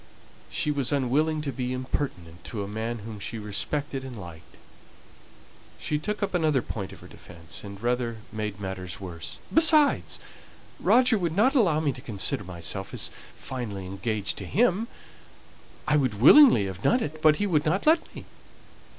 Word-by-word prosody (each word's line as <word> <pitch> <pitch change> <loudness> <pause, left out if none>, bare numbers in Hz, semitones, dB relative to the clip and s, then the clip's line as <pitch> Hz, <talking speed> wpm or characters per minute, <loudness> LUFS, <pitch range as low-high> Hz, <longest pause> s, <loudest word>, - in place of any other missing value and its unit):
She 150 - -1
was 140 -3 +1
unwilling 145 +3 +1
to 140 - -2
be 125 0 -3
impertinent 90 - -4
to 105 -3 -4
a - - -6
man 110 +2 -4
whom 110 -2 -7
she 115 +3 -5
respected 130 +7 -2
and 125 -4 -8
liked. 85 -3 -12 1.2
She 150 - -2
took 210 +6 -3
up 195 - -2
another 155 -7 +2
point 100 -4 -5
of - - -13
her - - -12
defence, 85 -2 -10
and 100 -1 -9
rather 120 0 -1
made 105 -2 -4
matters 95 -3 -5
worse. 85 -4 -7 0.2
"Besides, 310 -2 +5 0.6
Roger 245 -3 +4
would 170 -3 -2
not 235 +7 +4
allow 185 - +3
me 155 -3 +1
to 125 - -10
consider 105 -3 -1
myself 95 +2 -4
as - - -2 0.2
finally 110 -7 -6
engaged 100 +1 -2
to - - -6
him; 225 0 +2 1.0
I 150 0 +3
would 130 -8 0
willingly 150 - +8
have 95 -1 -6
done 245 - +2
it, 155 +1 -6
but 155 -1 +6
he 205 - -1
would 155 -6 +1
not 185 +6 0
let 320 +2 +2
me." - - -9
125 Hz, 165 wpm, -26 LUFS, 100-155 Hz, 1.2 s, willingly